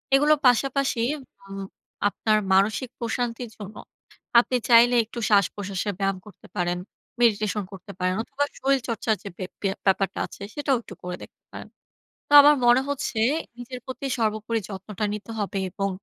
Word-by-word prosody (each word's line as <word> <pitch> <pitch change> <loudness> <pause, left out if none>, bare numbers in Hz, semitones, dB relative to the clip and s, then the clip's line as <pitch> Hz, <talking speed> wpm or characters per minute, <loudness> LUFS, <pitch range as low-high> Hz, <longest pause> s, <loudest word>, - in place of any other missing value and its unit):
এগুলো 295 +3 +5
পাশাপাশি 270 0 +2 0.2
উম 195 -7 -11 0.5
আপনার 215 +1 +1 0.2
মানসিক 205 +6 +2
প্রশান্তির 235 0 -3
জন্য 205 0 -9 0.6
আপনি 250 +1 0
চাইলে 240 +1 +7
একটু 235 +2 -8
শ্বাসপ্রশ্বাসের 200 0 +1
ব্যায়াম 195 -1 0
করতে 210 -4 -15
পারেন, 175 0 0 0.4
মেডিটেশন 215 -2 +2
করতে 195 +1 -10
পারেন 185 0 +1
অথবা 275 +3 -2 0.2
শরীরচর্চার 240 -5 0
যে 200 - -6
বে 185 - -4 0.4
ব্যাপারটা 195 0 +1
আছে, - - -14
সেটাও 285 -3 +1
একটু 210 - -11
করে 180 0 -4
দেখতে - - -16
পারেন। - - -9 0.6
তো - - -22
আমার 295 +1 +7
মনে 240 +2 +6
হচ্ছে 270 -5 -2 0.4
নিজের 245 +1 -7
প্রতি 260 +1 -5
সর্বোপরি 220 0 0
যত্নটা 200 +1 -4
নিতে 210 +2 -7
হবে 200 -1 -2
এবং 195 +2 -2
220 Hz, 145 wpm, -25 LUFS, 195-245 Hz, 0.6 s, চাইলে